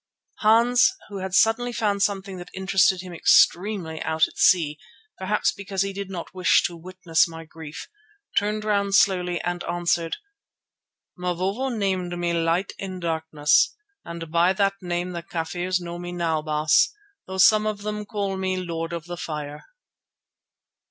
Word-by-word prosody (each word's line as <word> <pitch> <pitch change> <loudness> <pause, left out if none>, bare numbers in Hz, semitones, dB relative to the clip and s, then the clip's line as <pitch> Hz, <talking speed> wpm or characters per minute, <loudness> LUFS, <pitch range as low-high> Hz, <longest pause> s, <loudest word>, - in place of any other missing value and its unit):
Hans, 235 +3 +4
who 200 - -6
had 190 0 -3
suddenly 245 +4 +3
found 205 -3 -1
something 195 -2 -1
that 175 - -9
interested 190 -1 +2
him 180 -1 -9
extremely 175 -1 +3
out 160 0 +2
at - - -17
sea, 155 -5 +3 0.4
perhaps 205 +3 +1
because 195 -1 -2
he 195 0 -4
did 200 0 -6
not 180 -2 -7
wish 185 -1 +3
to 175 - -2
witness 175 -1 0
my 165 0 -9
grief, 160 -1 -9 0.5
turned 210 +1 0
round 200 -2 +1
slowly 180 -3 +3
and 175 0 -3
answered: 170 -1 -1 1.0
"Mavovo 185 +8 -2
named 190 -6 -2
me 175 0 -1
Light 170 +3 0
in 185 -2 -5
Darkness, 160 -3 +2 0.3
and 170 -1 -8
by 170 +3 +3
that 195 0 +1
name 175 0 -3
the 170 -1 -5
Kafirs 175 +2 -2
know 175 0 -7
me 175 0 -6
now, 165 -3 -1
Baas, 155 0 +3 0.4
though 190 0 -5
some 215 +3 +5
of 205 -1 -3
them 210 0 -3
call 200 -2 -3
me 185 0 -1
Lord 165 -2 -4
of 170 -2 -5
the 175 0 -6
Fire." 150 -3 -6
180 Hz, 155 wpm, -24 LUFS, 170-200 Hz, 1.0 s, some